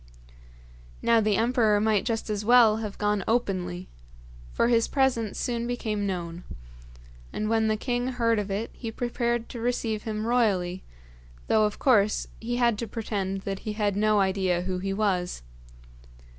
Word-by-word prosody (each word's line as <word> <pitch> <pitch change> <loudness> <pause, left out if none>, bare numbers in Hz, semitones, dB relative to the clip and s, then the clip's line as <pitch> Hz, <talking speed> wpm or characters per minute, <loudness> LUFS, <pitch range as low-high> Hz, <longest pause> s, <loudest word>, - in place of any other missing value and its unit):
Now 230 -1 +4
the 210 -2 +2
emperor 225 -3 +3
might 215 -1 +1
just 225 -2 -2
as 210 -1 -2
well 230 -1 +6
have 215 -3 -5
gone 210 -1 0
openly, 185 -6 -1 0.6
for - - +1
his 230 -1 +3
presence 245 -6 0
soon 235 -1 -2
became 215 -4 -2
known; 175 -2 -4 0.9
and 215 - -3
when 220 0 +2
the 215 0 +1
king 245 +2 -1
heard 230 -3 +1
of 205 -1 -4
it 205 +4 -3
he 230 - -6
prepared 235 0 -2
to 240 - -7
receive 230 -2 -1
him 215 0 -4
royally, 195 -7 +1 0.6
though 215 -1 +3
of 210 - -2
course 215 -6 +3
he 240 +2 -3
had 235 -3 +2
to 230 - -3
pretend 200 -3 -3
that 195 0 -4
he 215 - -5
had 205 -2 0
no 215 0 +3
idea 190 -2 +1
who 185 0 -2
he 195 +1 -3
was. 190 - -1
215 Hz, 160 wpm, -26 LUFS, 195-235 Hz, 0.9 s, well